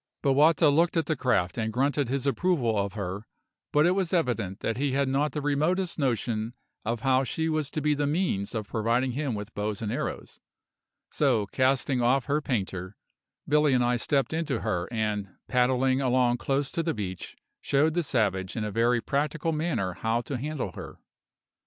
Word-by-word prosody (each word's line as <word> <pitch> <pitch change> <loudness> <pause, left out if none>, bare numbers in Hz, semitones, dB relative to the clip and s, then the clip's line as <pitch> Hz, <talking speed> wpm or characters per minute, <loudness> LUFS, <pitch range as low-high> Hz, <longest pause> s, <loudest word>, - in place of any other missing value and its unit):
Bowata 150 +3 +5
looked 165 +4 +2
at 165 - +2
the 155 - 0
craft 100 -8 0
and 110 0 -1
grunted 140 +2 +1
his 135 +1 -1
approval 140 -6 +1
of 100 -2 -1
her; 100 +1 -5 0.4
but 150 +1 +4
it 175 - +4
was 185 -2 0
evident 120 - 0
that 115 - -1
he 140 0 0
had 140 0 +2
not 140 +2 +1
the 150 +1 -4
remotest 165 +6 0
notion 115 -3 -1 0.3
of 115 0 -2
how 130 +1 +3
she 160 +4 -2
was 155 -3 -1
to 155 - -3
be 150 +1 +2
the 145 0 0
means 145 - -1
of 110 -2 -3
providing 115 +4 0
him 135 -2 -2
with 105 +2 -7
bows 105 0 -3
and 110 -2 -3
arrows; - - -4 0.7
so, 105 -2 +2
casting 130 +3 +1
off 125 +2 +2
her 150 +2 0
painter, 95 -7 -3 0.5
Billy 150 -1 +3
and 125 -1 +3
I 120 0 +2
stepped 140 +4 0
into 165 -1 -1
her 90 -5 -1
and, 105 -4 -2
paddling 130 +1 +2
along 125 -2 +2
close 135 +1 -1
to 165 - -1
the 165 -3 -1
beach, 95 -4 -6 0.2
showed 150 +3 +2
the 175 - +1
savage 100 - 0
in 110 - -2
a 105 - -3
very 115 +3 +2
practical 150 +5 -1
manner 155 - -1
how 115 +5 -1
to 130 +2 -4
handle 145 -7 -3
her. - - -9
130 Hz, 185 wpm, -27 LUFS, 110-150 Hz, 0.7 s, Bowata